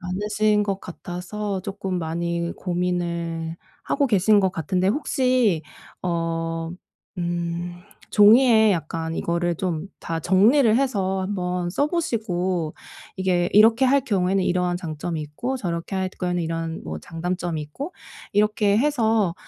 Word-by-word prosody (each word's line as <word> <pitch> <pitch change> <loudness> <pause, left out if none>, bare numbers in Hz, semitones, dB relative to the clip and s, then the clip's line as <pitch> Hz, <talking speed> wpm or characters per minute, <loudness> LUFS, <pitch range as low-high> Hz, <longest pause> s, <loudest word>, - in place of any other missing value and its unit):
많으신 210 +3 +1
것 195 -1 -2
같아서 185 +3 -5
쪼끔 195 -2 -3
많이 170 +1 -2
고민을 170 -2 -2 0.3
하고 280 0 +1
계신 205 0 +4
것 190 -1 +2
같은데 180 +3 0
혹시 250 - +2 0.4
어 165 -1 -2 0.5
음 175 0 -2 0.4
종이에 220 +1 +6
약간 165 -1 -3
이거를 170 0 0
좀 180 -1 -3
다 165 -1 -3
정리를 215 - +4
해서 200 -8 0
한번 180 -2 -2
써 285 +11 +1
보시고 190 - -1 0.4
이게 180 -2 +1
이렇게 225 +4 +6
할 275 +1 +4
경우에는 195 -5 +1
이러한 180 0 +1
장점이 165 -1 -4
있고 235 - -4
저렇게 175 -2 -3
할 190 0 -1
경우에는 180 -1 -2
이런 165 0 -3
뭐 80 0 -5
장단점이 175 - -3
있고 280 - -7 0.4
이렇게 210 0 +3
해서 225 - +2
180 Hz, 270 characters per minute, -23 LUFS, 170-210 Hz, 0.5 s, 종이에